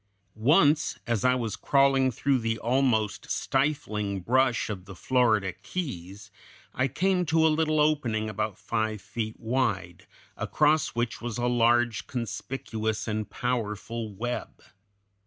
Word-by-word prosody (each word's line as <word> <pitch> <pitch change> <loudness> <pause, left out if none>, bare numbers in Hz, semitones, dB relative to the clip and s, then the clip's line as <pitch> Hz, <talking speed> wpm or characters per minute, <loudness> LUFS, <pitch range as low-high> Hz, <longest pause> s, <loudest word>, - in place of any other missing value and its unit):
Once 145 +6 +3
as 115 -4 -1
I 125 0 +4
was 115 -4 -2
crawling 135 -1 +3
through 135 +2 +1
the 115 -1 -1
almost 120 -3 0
stifling 110 -9 -1
brush 125 +4 +2
of 105 - -3
one - - -16
of - - -22
the 95 0 -10
Florida 110 -4 +2
Keys 100 - -6 0.4
I 130 - +1
came 180 +7 +1
to 160 +1 +3
a - - +6
little 155 0 +1
opening 130 -8 +1
about 110 -1 -3
five 110 +1 -2
feet 110 +2 -5
wide, 105 -8 -2 0.3
across 150 -2 +1
which 120 0 -2
was 120 -1 -4
a 120 - -1
large, 120 -1 +2
conspicuous, 110 -2 -3
and 110 -1 -2
powerful 115 -2 -3
web. 120 +4 -5
120 Hz, 140 wpm, -27 LUFS, 110-135 Hz, 0.4 s, a